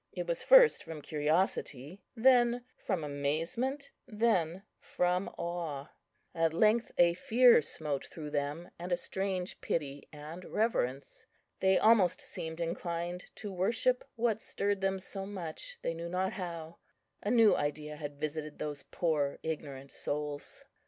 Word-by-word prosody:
It - - -3
was - - -1
first - - +7
from 160 -3 -8
curiosity, 150 0 -1
then 245 0 +4
from 185 -6 -2
amazement, 165 - -2 0.2
then 195 -5 +1 0.2
from 180 +2 0
awe. 170 -5 -4 0.4
At 165 -1 +1
length 220 +5 +3
a 170 -1 +6
fear 245 - +6
smote 145 -1 -2
through 150 -2 -8
them, 145 +4 -3
and 175 +1 -5
a 175 - +3
strange 190 -1 -3
pity 145 -3 -3
and 155 +4 -9
reverence. 140 - -1 0.3
They 190 0 +4
almost 215 -6 +5
seemed 160 0 -6
inclined 170 +1 -3
to 205 -2 -6
worship 225 +7 +1
what 225 -2 +1
stirred 200 -1 -1
them 195 0 +1
so 195 +1 -5
much, 195 - -5
they - - 0
knew 170 +1 -5
not 185 +2 -1
how; 170 -3 -6 0.4
a 205 - -2
new 230 -2 +6
idea 150 +1 -2
had 145 -1 -7
visited 155 0 -4
those 145 -2 -4
poor 150 -5 -1
ignorant 140 -4 -5
souls. 145 0 -4
170 Hz, 140 wpm, -32 LUFS, 150-205 Hz, 0.4 s, first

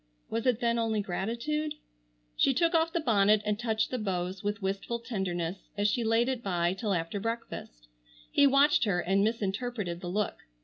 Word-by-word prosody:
Was 230 +3 -1
it 245 -2 +2
then 235 0 +2
only 225 -2 +1
gratitude? 235 +11 -2 0.6
She 270 - +3
took 335 +2 +2
off 330 0 +3
the 340 - 0
bonnet 210 -6 +3
and 210 0 0
touched 220 -2 0
the 255 - -1
bows 185 -2 -2
with 205 0 -1
wistful 195 +4 -2
tenderness 190 -6 -3
as 205 0 +2
she 230 +3 +1
laid 225 +2 +3
it 260 -2 -1
by 175 -4 0
till 195 0 -1
after 165 +4 -2
breakfast. 205 - -5 0.4
He 285 - +5
watched 280 +3 +4
her 185 -4 +1
and 195 +3 +2
misinterpreted 210 -3 -2
the 180 - -5
look. 210 +2 -1
215 Hz, 180 wpm, -29 LUFS, 190-240 Hz, 0.6 s, He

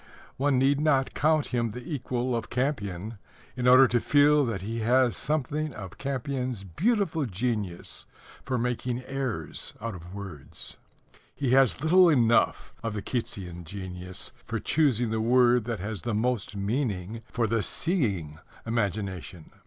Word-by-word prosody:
One 140 0 +2
need 135 +2 +3
not 140 -4 +2
count 155 -1 +2
him 120 -2 +1
the 125 +7 -6
equal 125 -2 -1
of 115 -1 -3
Campion 110 -6 -2 0.4
in 125 0 0
order 130 +1 +8
to 120 - +3
feel 145 +3 +5
that 100 -5 -3
he 115 +3 -3
has 125 +2 +3
something 150 0 -1
of 95 -4 -9
Campion's 130 -4 -3
beautiful 165 - 0
genius 105 -3 -3 0.3
for 130 -2 -2
making 125 +1 -2
airs 135 -3 -3
out 115 +1 -4
of 90 +1 -10
words. 95 -9 -8 0.6
He 135 -4 0
has 135 -2 +4
little 180 +2 +6
enough 120 -6 +3
of 115 -2 -3
the 105 - -4
Keatsian 90 -8 -4
genius 90 0 -6
for - - -3
choosing 125 -7 +2
the 110 0 0
word 120 0 +4
that 115 -2 -3
has 100 -1 -4
the 110 +4 -2
most 115 -2 -1
meaning 105 -1 -2
for 120 -1 +1
the 115 0 +1
seeing 100 - -1 0.3
imagination. 100 -6 -3
120 Hz, 145 wpm, -27 LUFS, 100-135 Hz, 0.6 s, order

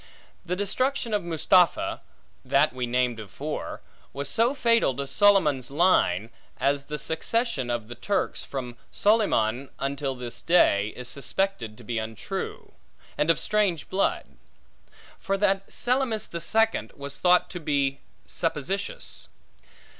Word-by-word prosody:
The 180 0 -2
destruction 235 +5 -1
of 205 -3 +1
Mustapha 170 +1 +2 0.4
(that 140 +3 +3
we 125 -1 -2
named 125 -1 +1
before) 105 -4 -6 0.3
was 140 0 -4
so 235 +5 +2
fatal 230 - +3
to 140 - -3
Solyman's 150 - +3
line, 135 - +2 0.3
as 140 0 +1
the 150 +1 -4
succession 160 - 0
of 120 -2 -2
the 120 - -7
Turks, 195 - -1
from 125 -3 -6
Solyman 140 - +2
until 135 0 -2
this 125 -2 -5
day, 105 - +4
is 125 -1 -6
suspected 135 - -2
to 120 - -13
be 115 +1 -2
untrue, 110 -1 -5 0.4
and 150 - +1
of 165 - +5
strange 205 -6 0
blood; 195 +1 +1 0.9
for 195 0 -1
that 195 -1 +1
Selymus 245 -4 0
the 170 - -6
Second, 225 +4 +1
was 140 0 -7
thought 180 0 +4
to 180 - -5
be 140 -3 0 0.3
suppositious. 175 +5 -3
150 Hz, 130 wpm, -26 LUFS, 125-195 Hz, 0.9 s, of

